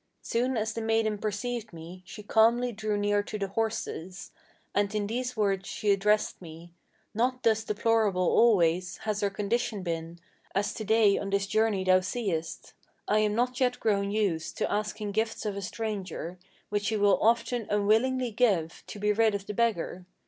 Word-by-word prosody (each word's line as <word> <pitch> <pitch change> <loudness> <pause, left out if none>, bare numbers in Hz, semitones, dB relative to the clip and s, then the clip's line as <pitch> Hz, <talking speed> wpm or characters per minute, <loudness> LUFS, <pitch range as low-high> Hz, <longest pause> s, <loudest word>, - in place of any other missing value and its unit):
Soon 245 +2 0
as 220 0 -1
the 230 - -4
maiden 220 -1 +1
perceived 225 +3 -3
me, 170 +2 -10
she 210 - -9
calmly 235 +4 +3
drew 215 -1 -2
near 205 0 +2
to 215 - -6
the 195 -1 -3
horses, 195 -4 -3 0.4
And 205 +1 0
in 210 -1 0
these 250 +3 -3
words 195 -2 0
she 210 - 0
addressed 210 +1 +1
me: 165 0 -11 0.4
'Not 250 +3 0
thus 220 -1 +3
deplorable 210 -3 +1
always 180 -4 +3
Has 210 -1 -1
our 200 - +2
condition 205 +1 -2
been, 165 -1 -4 0.4
as 200 +1 0
to 220 - -5
day 215 -1 +4
on 200 - -4
this 200 0 +1
journey 215 -1 +1
thou 185 0 +5
seest. 185 -5 -3 0.3
I 215 - +3
am 210 -1 +1
not 250 +2 0
yet 250 -1 +1
grown 200 -2 +1
used 200 -6 -1
to - - -1
asking 210 0 -2
gifts 220 +2 -2
of 205 -2 -2
a 200 - -4
stranger, 190 -4 -5 0.3
Which 205 0 -1
he 220 - 0
will 205 -1 +3
often 235 0 +1
unwillingly 225 +5 +2
give, 200 -8 +1
to - - -8
be 210 +1 +1
rid 220 -1 +3
of 200 -1 -4
the 210 - -5
beggar. 195 -5 -1
210 Hz, 180 wpm, -28 LUFS, 195-225 Hz, 0.4 s, thou